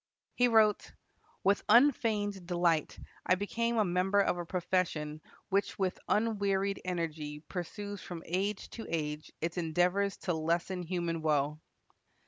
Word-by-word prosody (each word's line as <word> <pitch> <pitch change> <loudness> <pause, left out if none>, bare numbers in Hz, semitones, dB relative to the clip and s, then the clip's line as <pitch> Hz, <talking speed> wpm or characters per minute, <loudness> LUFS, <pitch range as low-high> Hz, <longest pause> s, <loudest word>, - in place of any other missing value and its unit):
He 245 - +4
wrote, 220 -3 +3 0.5
"With 200 +1 +3
unfeigned 215 -8 +3
delight 175 -3 +1 0.3
I 185 - +3
became 230 +4 -1
a 215 - +4
member 185 +3 +2
of 200 - +3
a 175 - -5
profession 165 -4 -1 0.3
which 200 0 0
with 190 -1 -1
unwearied 200 -3 +1
energy 155 -4 -3
pursues 200 +4 -6
from 170 -2 -7
age 195 +4 -2
to 225 - -7
age 150 -2 -3
its 165 +2 -2
endeavors 180 +4 +1
to 180 - +1
lessen 170 +3 -1
human 170 -1 -2
woe." 150 -1 +1
180 Hz, 130 wpm, -32 LUFS, 165-200 Hz, 0.5 s, He